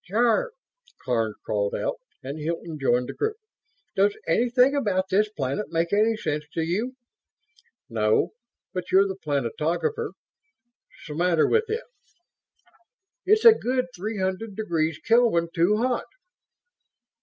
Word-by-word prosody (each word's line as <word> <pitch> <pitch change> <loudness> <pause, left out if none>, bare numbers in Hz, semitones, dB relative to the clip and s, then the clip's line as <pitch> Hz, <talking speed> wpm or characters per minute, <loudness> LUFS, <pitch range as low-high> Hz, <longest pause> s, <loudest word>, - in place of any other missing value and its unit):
"Jarve!" 235 - +2 0.5
Karns 115 -4 0
called 100 -1 -1
out, - - -2 0.3
and 140 +4 -5
Hilton 165 0 -4
joined 125 -2 +2
the - - -5
group. 435 0 -1 0.6
"Does 200 +1 +2
anything 245 +9 +3
about 195 -8 0
this 210 +2 +2
planet 150 0 -3
make 165 +1 0
any 220 +2 +3
sense 150 -6 -2
to 165 - 0
you?" 215 +10 -2 0.9
"No. 110 -3 +1 0.4
But 185 -1 -5
you're 195 +1 +5
the 190 - -4
planetographer. 155 - -2 0.9
'Smatter 165 +2 +1
with 455 0 +2
it?" 450 +3 -2 1.4
"It's 430 +3 +4
a 460 - +11
good 255 - -1
three 210 +4 -4
hundred 190 +3 -2
degrees 165 -7 -1
Kelvin 225 -8 +3
too 175 +5 +3
hot." 250 +2 0
185 Hz, 125 wpm, -25 LUFS, 155-230 Hz, 1.4 s, a